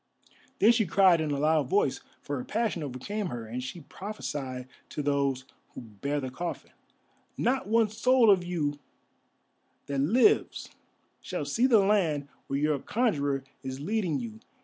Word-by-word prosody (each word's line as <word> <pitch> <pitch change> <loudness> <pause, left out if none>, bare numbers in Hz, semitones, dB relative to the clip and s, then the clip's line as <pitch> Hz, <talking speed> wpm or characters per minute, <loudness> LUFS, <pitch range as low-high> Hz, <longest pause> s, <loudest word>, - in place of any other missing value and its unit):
Then 220 - +6
she 225 -4 +2
cried 185 -3 +5
in 155 - -1
a 145 - -1
loud 150 -2 +2
voice, 135 -10 +1 0.2
for 145 - -3
her - - -4
passion 215 - -1
overcame 155 +10 -4
her, 120 -7 -5
and 120 +3 -5
she 130 +7 -7
prophesied 140 -9 -6 0.2
to 150 - -4
those 140 -2 0 0.3
who - - -6
bare 120 +6 -3
the 130 -2 -5
coffin, 175 +6 -5 0.7
"Not 265 0 0
one 225 +1 +3
soul 235 +1 +4
of 185 -3 +3
you 150 -5 -2 1.1
that 140 -1 -2
lives 240 - +3 0.5
shall 180 -5 -4
see 230 - +2
the 220 -6 +5
land 165 -9 +1 0.2
where 135 - -1
your 150 0 +1
conjurer 145 - 0 0.2
is 130 0 -6
leading 180 -1 -1
you! 225 -2 -6
155 Hz, 155 wpm, -28 LUFS, 140-210 Hz, 1.1 s, Then